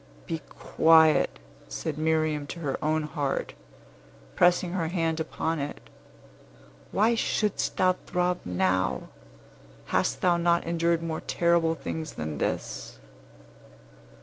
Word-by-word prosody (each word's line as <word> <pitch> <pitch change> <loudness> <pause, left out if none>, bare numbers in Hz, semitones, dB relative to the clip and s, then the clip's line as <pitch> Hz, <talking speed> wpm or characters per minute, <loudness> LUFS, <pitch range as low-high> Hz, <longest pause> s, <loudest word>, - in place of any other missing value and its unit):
"Be 165 - -3 0.2
quiet," 160 -1 +4 0.3
said - - -4
Miriam 155 -2 +1
to 170 - -7
her 145 -4 -3
own 155 +1 +1
heart, 145 -2 -2 0.8
pressing 175 0 +3
her 175 -3 -1
hand 165 -2 -1
hard 160 - -2
upon 160 0 -2
it. 140 +1 -4 1.1
"Why 220 +4 +3
shouldst 215 -2 0
thou 185 0 +4
throb 180 0 0
now? 95 +1 0 0.8
Hast - - +1
thou 175 -2 +3
not 170 0 +2
endured 170 0 0
more 160 -1 -3
terrible 170 -1 +2
things 160 -1 -5
than 75 -1 -5
this?" - - -3
160 Hz, 120 wpm, -27 LUFS, 150-170 Hz, 1.1 s, quiet